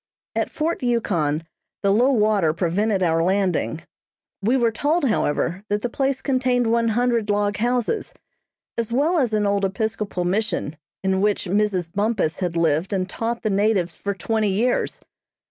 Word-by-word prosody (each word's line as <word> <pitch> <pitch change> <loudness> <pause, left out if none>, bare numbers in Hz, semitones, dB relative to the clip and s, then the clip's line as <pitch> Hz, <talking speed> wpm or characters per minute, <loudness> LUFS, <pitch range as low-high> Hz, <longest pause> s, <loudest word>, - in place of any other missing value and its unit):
At - - 0
Fort 325 +2 -2
Yukon 175 - 0 0.4
the 200 - +3
low 245 +6 +4
water 210 - +2
prevented 190 +4 0
our 165 -1 +2
landing. 185 -3 0 0.6
We 235 +7 +2
were 235 -2 +2
told, 290 +7 +1
however, 180 -3 0
that 205 0 -1
the 245 - -2
place 270 0 -1
contained 255 -2 +1
one 230 0 +2
hundred 230 -1 +1
log 205 0 +1
houses, 245 - 0 0.7
as 230 -1 -2
well 305 +8 +2
as 250 -5 +1
an 210 -1 +1
old 200 0 +1
Episcopal 205 -2 -2
Mission, 190 -5 -1 0.3
in 190 0 +1
which 205 0 +1
Mrs. 185 -3 0
Bumpus 205 -6 0
had 175 -3 -2
lived 165 +4 +1
and 185 -1 0
taught 230 +4 -3
the 215 - 0
natives 195 -4 +1
for 200 0 -3
twenty 215 +2 0
years. 225 +6 0
210 Hz, 160 wpm, -22 LUFS, 190-235 Hz, 0.7 s, low